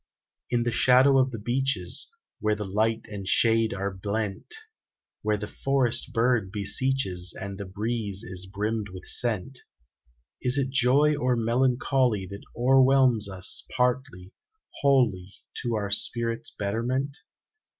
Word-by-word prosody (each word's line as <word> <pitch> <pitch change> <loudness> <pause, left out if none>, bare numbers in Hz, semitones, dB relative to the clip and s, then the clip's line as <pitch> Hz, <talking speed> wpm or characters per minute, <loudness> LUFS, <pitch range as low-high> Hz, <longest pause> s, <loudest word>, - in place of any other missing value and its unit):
In 120 -1 +1
the 120 - 0
shadow 130 +3 +5
of 130 0 +3
the 120 - -6
beeches, 120 -4 -1 0.3
Where 105 0 +1
the 105 0 -5
light 110 +3 0
and 100 -3 -7
shade 115 +2 +3
are 100 -1 -3
blent; 100 - -3 0.7
Where 105 0 0
the 105 - -5
forest 130 0 0
bird 115 -4 +1
beseeches, 100 -3 0
And 100 0 -6
the 100 - -5
breeze 105 0 -2
is 95 -4 -6
brimmed 105 +2 -3
with 95 0 -10
scent, 120 +2 0 0.8
Is 125 +2 +2
it 135 -1 0
joy 140 +3 +4
or 125 -3 +1
melancholy 120 -2 +1
That 100 +2 -9 0.2
o'erwhelms 130 -3 +4
us 95 0 -1
partly, 125 -7 -1 0.5
wholly, 115 -10 +2 0.3
To 120 -1 -1
our 100 -2 -2
spirit's 115 +3 -1
betterment? 125 +8 -2
115 Hz, 130 wpm, -26 LUFS, 100-130 Hz, 0.8 s, shadow